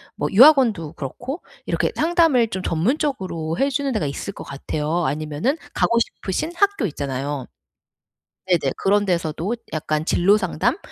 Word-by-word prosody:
뭐 - - -1
유학원도 225 - +5
그렇고 210 - -6 0.2
이렇게 - - 0
상담을 320 -7 +3
좀 190 - -4
전문적으로 180 - -1
해주는 275 0 0
데가 215 -9 -1
있을 140 +8 -5
것 - - -9
같아요. 150 +4 -2
아니면은 155 - -1 0.2
가고 235 - +2
싶으신 230 - -2
학교 400 - +2
있잖아요. 140 -2 -4 1.0
네네. 165 -7 +2
그런 205 +1 +2
데서도 170 +3 -1 0.2
약간 155 0 -1
진로 195 +5 +4
상담 185 - 0
185 Hz, 325 characters per minute, -22 LUFS, -, 1.0 s, 유학원도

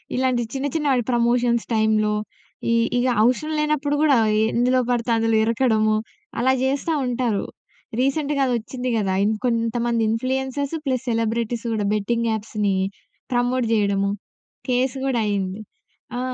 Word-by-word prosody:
ఇలాంటి 255 -1 +1
చిన్న 270 +1 -2
చిన్న 300 -2 0
వాటి 250 -3 +2
ప్రమోషన్స్ 235 0 +2
టైంలో, 215 -1 +2 0.6
ఇ - - +3 0.2
ఇగా 250 +1 +2
అవసరం 255 +7 +1
లేనప్పుడు 300 -1 0
గూడా 290 -5 +5 0.4
ఎందులో 250 +2 +3
పడితే 240 -1 0
అందులో 225 0 +1
ఇరకడము, 220 -2 +2 0.4
అలా 260 +2 +3
చేస్తా 280 +5 0
ఉంటారు. 240 -4 -1 0.5
రీసెంట్‌గా 280 +2 +1
అదొచ్చింది 245 +1 -2
గదా! 195 -3 0
ఇంకొంతమంది 230 +1 0
ఇన్‌ఫ్లుయెన్సర్స్ 265 +5 -1
ప్లస్ 260 -1 -1
సెలబ్రిటీస్ 230 +1 -1
గూడా 210 -2 -1
బెట్టింగ్ 230 +3 0
యాప్స్‌ని 210 -2 -1 0.6
ప్రమోట్ 245 +1 +1
చేయడము, 200 -2 +1 0.6
కేస్ 250 +1 +1
గూడా 255 -4 +1
అయింది. 195 0 -2 0.6
ఆ! - - -2
240 Hz, 125 wpm, -22 LUFS, 220-260 Hz, 0.6 s, గూడా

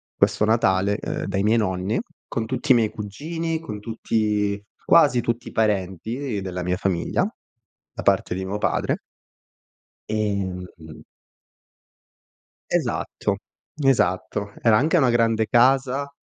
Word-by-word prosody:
questo 105 - +2
Natale, 100 -3 +2
ehm, - - -4
dai 100 0 -1
miei 110 +2 +3
nonni 95 - -1 0.3
con 115 -1 -2
tutti 140 - -1
i - - +8
miei 110 -3 +3
cugini, 160 +10 -4
con 105 -10 -7
tutti 105 -2 -1 0.2
quasi 145 -7 +5
tutti 120 +1 -2
i - - -13
parenti 110 - -1
della 90 -1 -4
mia 90 +1 0
famiglia 95 - 0 0.7
da - - -6
parte - - +2
di 95 0 -3
mio 100 +2 -3
padre - - 0 1.1
Ehm, 100 -4 -1
mh-mh. 80 -1 -12 1.7
Esatto. - - -1 0.4
Esatto. 100 -4 +1
Era 115 -2 +5
anche 155 +7 +3
una 130 -6 +4
grande 115 -2 +2
casa. 135 +3 +3
110 Hz, 125 wpm, -23 LUFS, 95-120 Hz, 1.7 s, i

